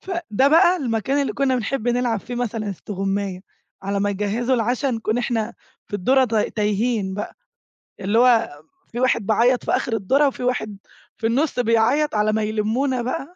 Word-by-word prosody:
فده 335 - 0
بقى 345 +4 +5
المكان 265 - -1
اللي 275 - -2
كنا 265 -2 +1
بنحب 245 +1 -2
نلعب 240 -3 0
فيه 245 - -7
مثلًا 225 -3 -3
استغماية، 195 0 -3 0.4
على 200 +1 -2
ما 205 0 +1
يجهزوا 210 +6 -1
العشا 245 +3 0
نكون 225 -2 -1
إحنا 235 -2 -2 0.3
في 205 - -3
الدُرة 260 +7 +3
ت 230 -2 -4
تايهين 210 -1 0
بقى، 205 - -6 0.6
اللي 205 +4 +1
هو 230 -11 +3 0.3
في 240 - -5
واحد 250 -4 +1
بيعيط 235 +4 +2
في - - -1
آخر 240 - 0
الدُرة 265 +8 +2
وفي 265 - -4
واحد 245 -5 -2 0.4
في 225 - -1
النص 260 +3 0
بيعيط 235 +5 +2
على 210 0 +2
ما 220 0 0
يلمونا 225 +5 0
بقى. 275 +7 -4
230 Hz, 170 wpm, -22 LUFS, 210-255 Hz, 0.6 s, بقى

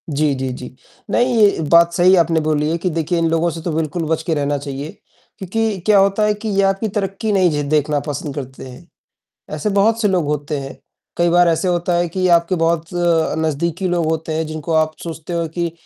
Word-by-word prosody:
जी, 150 0 +1
जी, 130 0 -3
जी। 125 0 -9 0.4
नहीं, 245 +2 +2
ये 205 -6 +4
बात 170 0 +5
सही 180 +2 +5
आपने 165 -1 +3
बोली 150 -1 0
है 165 - 0
कि 180 +2 -2
देखिए 165 +1 -1
इन 165 - +1
लोगों 165 +1 +1
से 165 0 -6
तो 170 - -3
बिल्कुल 160 +2 -2
बच 160 0 0
के 165 - -1
रहना 145 -1 0
चाहिए। 140 +1 -6 0.5
क्योंकि 210 +2 -2
क्या 210 -2 +5
होता 195 +2 +2
है 210 0 +3
कि 210 +1 -6
ये 200 -1 +1
आपकी 195 +3 +1
तरक़्क़ी 200 +1 -2
नहीं 190 -3 +3
झे 145 -1 -1
देखना 150 0 +1
पसंद 145 -1 -4
करते 130 -2 -7
हैं। 125 0 -13 0.7
ऐसे 155 +7 -2
बहुत 215 +3 +2
से 210 - +2
लोग 185 -4 +1
होते 150 0 -2
हैं, 135 -1 -8 0.4
कई 175 0 +2
बार 175 0 +4
ऐसे 165 +3 +1
होता 175 0 0
है 175 0 +1
कि 185 +2 -1
आपके 170 +2 +2
बहुत 165 0 0 0.6
नज़दीकी 170 +4 -1
लोग 175 -1 0
होते 160 0 -2
हैं 160 0 -1
जिनको 155 +1 -5
आप 155 0 +2
सोचते 165 0 -7
हो 170 -1 -1
कि 170 -1 -2
165 Hz, 220 wpm, -18 LUFS, 155-185 Hz, 0.7 s, बात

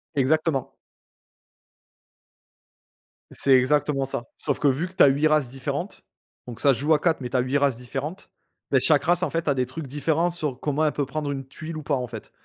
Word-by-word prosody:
Exactement. 145 0 +1 2.6
C'est 135 - +2
exactement 140 +1 +1
ça. 120 -3 -4
Sauf 140 - -1
que, 145 - +2
vu 140 +6 +1
que 185 - -15
tu 190 - +6
as - - +8
8 145 +3 +2
races 150 -5 +2
différentes 140 +8 -5 0.4
donc 120 -2 -8
ça 140 - +4
se - - -5
joue 150 +4 +3
à 150 - +3
4, 165 -4 +1
mais 125 - -4
tu 130 - 0
as - - +3
8 130 +3 0
races 140 -4 +1
différentes. 140 +9 -6 0.4
Ben 135 -2 +3
chaque 145 +1 +3
race, 175 +1 +2
en - - +1
fait, 165 -1 -3
a 145 - +4
des 130 -1 0
trucs 135 +4 -7
différents 160 +5 0
sur 150 -7 -3
comment 150 +1 0
elle 150 - +2
peut 145 - -2
prendre 145 +1 -3
une 135 -1 -5
tuile 155 +4 -8
ou 155 - -6
pas, 145 0 0
en 125 -2 -3
fait. 115 -3 -9
145 Hz, 215 wpm, -24 LUFS, 130-155 Hz, 2.6 s, as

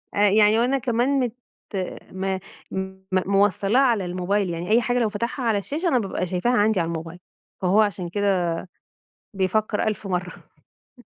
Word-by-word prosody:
آآ 205 0 +4
يعني 210 +2 +5
وأنا 255 +3 +2
كمان 255 +2 +1
مت 245 -3 -1 0.8
ما 190 0 -2 0.3
م 190 0 -4
موصّلاَه 195 +3 +2
على 230 -8 +2
الموبايل. 185 +2 -1
يعني 170 +2 -4
أي 235 +2 +5
حاجة 245 +1 0
لو 225 -3 +2
فتحها 235 +5 -3
على 225 -3 +2
الشاشة، 300 - -2
أنا 255 -7 +3
بابقى 195 -3 -2
شايفاها 185 +7 0
عندي 210 -1 +3
على 165 - 0
الموبايل، 165 +1 -5 0.4
فهو 195 +4 +4
عشان 190 -4 -1
كده، 195 -2 +1 0.9
بيفكّر 210 +3 0
ألف 215 -1 -4
مَرّة 180 -1 -2 0.5
امم. 245 - -22
205 Hz, 160 wpm, -24 LUFS, 185-235 Hz, 0.9 s, يعني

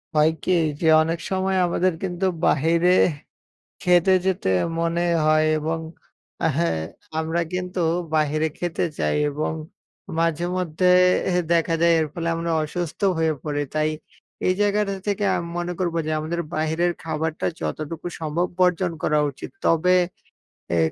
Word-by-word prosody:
হয় 155 +1 +5
কি? - - 0 0.3
যে 165 - 0 0.2
অনেক 165 +1 -2
সময় 190 0 0
আমাদের 180 +1 +1
কিন্তু 180 0 -2 0.2
বাহিরে 165 +4 +3 0.9
খেতে 180 +1 +4
যেতে 190 - 0 0.3
মনে 170 +1 0 0.2
হয় 155 0 +4
এবং 160 +2 -2 0.7
আ - - +4
হ্যাঁ 165 - +1 0.4
আমরা 160 +2 0
কিন্তু 180 0 -3 0.3
বাহিরে 155 0 +2
খেতে 175 -1 -1
চাই - - +1
এবং 150 +2 -2 0.7
মাঝে 165 0 +1
মধ্যে 180 0 -1 0.4
এহ 180 - +1 0.2
দেখা 165 0 +2
যায় 170 0 +5
এর 155 - +1
ফলে 170 -1 -2
আমরা 165 0 -2
অসুস্থ 165 +1 -4 0.2
হয়ে 160 -1 +2
পড়ি, 145 -1 -2
তাই 155 0 +1 0.6
এই 185 - +4
জায়গাটা 205 -1 +1
থেকে 205 0 0
আমি 170 -1 -4
মনে 175 0 -2
করবো 175 -3 -1
যে - - -2
আমাদের 160 +3 -3
বাইরের 160 +3 +1
খাবারটা 160 0 -2
যতটুকু 155 +2 -4
সম্ভব 160 +3 0
বর্জন 180 -1 +2
করা 150 - +2
উচিত। 135 - -9 0.2
তবে 175 +3 +4 0.8
এ - - +2
170 Hz, 145 wpm, -23 LUFS, 155-180 Hz, 0.9 s, হয়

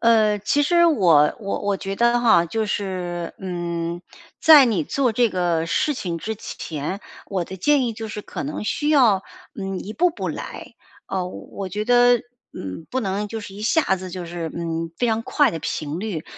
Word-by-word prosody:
呃， 220 -2 +4
其 280 +8 +1
实 340 +3 +4
我 170 - +4
我 200 -3 -3
我 200 -1 0
觉 195 0 -4
得 235 +2 +3
哈， 220 -8 +5
就 220 +6 -1
是， 180 -4 -3
嗯， 170 -2 -3 0.4
在 300 -3 +9
你 235 +5 +1
做 265 -5 0
这 240 +1 +3
个 175 -3 0
事 295 - +1
情 175 -7 -3
之 220 +6 -4
前， 160 +1 -5 0.3
我 185 -3 -2
的 190 - -8
建 275 +5 +3
议 230 - -2
就 220 0 -6
是 210 0 -6
可 - - -6
能 280 -6 -4
需 295 +7 -1
要， 240 -10 +4 0.4
嗯， 195 -1 -3
一 210 - -6
步 355 +6 +3
步 340 - -4
来。 - - -7 0.3
啊， 185 -2 -2
我 190 +1 -7
觉 210 +3 -3
得， 245 0 +5 0.3
嗯， 95 - -7
不 260 - -1
能 200 -1 -2
就 220 +1 -5
是 205 - -9
一 205 +2 -8
下 315 +7 +3
子 185 0 -7
就 180 -2 -5
是， 170 -1 -4
嗯， 165 -1 -3
非 245 - +1
常 225 0 0
快 265 +2 +2
地 165 - -4
频 155 +1 -3
率。 190 -7 -4
200 Hz, 210 characters per minute, -22 LUFS, 175-240 Hz, 0.4 s, 在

